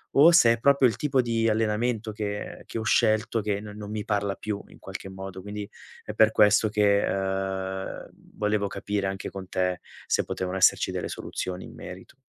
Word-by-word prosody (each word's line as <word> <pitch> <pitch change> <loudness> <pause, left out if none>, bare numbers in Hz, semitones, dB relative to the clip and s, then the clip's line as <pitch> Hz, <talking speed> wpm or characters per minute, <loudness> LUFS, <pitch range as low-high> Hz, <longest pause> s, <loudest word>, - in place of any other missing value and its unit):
o 155 +5 +8
se 120 -9 +7
è 115 - -4
proprio 140 -1 +5
il - - -5
tipo 135 -3 +2
di 115 -1 0
allenamento 110 +1 0
che 105 -1 -5
che - - -6
ho - - -3
scelto 110 +1 +2
che 105 -1 -2
non 105 0 -9
non 105 -1 -7
mi 105 -1 -3
parla 100 -2 0
più, 105 -2 -4
in - - -16
qualche - - -8
modo. 95 0 -8
Quindi 105 +1 -6 0.3
è - - -6
per 110 0 +5
questo 105 +1 +5
che, 100 -1 +3
uhm, 95 0 -3 0.3
volevo 105 -1 0
capire, 100 0 -2
anche 95 0 -4
con 95 -1 -8
te, 90 -1 0 0.3
se - - +1
potevano 95 0 -3
esserci 95 - +4
delle - - -3
soluzioni 90 0 -5
in - - -12
merito. 90 0 -10
105 Hz, 190 wpm, -26 LUFS, 95-110 Hz, 0.3 s, o